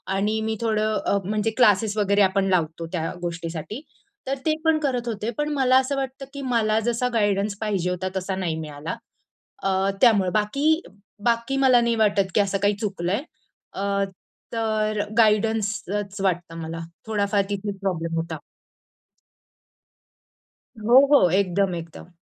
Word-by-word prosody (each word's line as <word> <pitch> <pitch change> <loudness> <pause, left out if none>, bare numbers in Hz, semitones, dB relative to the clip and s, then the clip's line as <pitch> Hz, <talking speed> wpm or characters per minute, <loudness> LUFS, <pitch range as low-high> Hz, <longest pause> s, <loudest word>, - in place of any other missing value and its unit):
आणि 210 +3 0
मी 220 0 -1
थोडं 215 -1 +1
अ, 200 - +2
म्हणजे 215 +2 0
क्लासेस 215 -2 +4
वगैरे 200 0 +3
आपण 195 0 +3
लावतो 165 -2 0
त्या 165 -3 -2
गोष्टीसाठी 170 - -5 0.5
तर 270 - 0
ते 310 - +3
पण 320 -1 +4
करत 255 -5 -1
होते, 220 -1 -3
पण 295 0 0
मला 260 -2 +4
असं 265 +2 -1
वाटतं 270 0 -4
की 280 - -6
मला 220 -3 +2
जसा 240 +2 0
गाईडन्स 205 -2 +1
पाहिजे 195 -5 0
होता 180 +1 -2
तसा 190 0 -2
नाही 180 -4 -2
मिळाला 150 0 -5 0.7
अ, 195 0 +1
त्यामुळं. 205 -7 +5
बाकी 280 +10 +2 0.4
बाकी 235 +3 +1
मला 260 -3 +5
नाही 235 0 +1
वाटत 205 -3 +2
की 210 - +5
असं 200 -1 0
काही 205 0 +2
चुकलं 190 -5 -2
आहे. 210 +8 0 0.5
अ, 200 0 0 0.5
तर 215 -2 0 0.2
गाईडन्सच 210 -2 +1
वाटतं 175 -3 -1
मला, 165 +1 -5 0.3
थोडाफार 205 -2 +1
तिथे 205 0 -3
प्रॉब्लेम 170 -4 -2
होता. 165 -1 -3 2.4
हो, 235 +4 +6
हो, 275 -12 +6
एकदम, 190 0 +1
एकदम. 165 +1 -9
205 Hz, 145 wpm, -24 LUFS, 190-230 Hz, 2.4 s, हो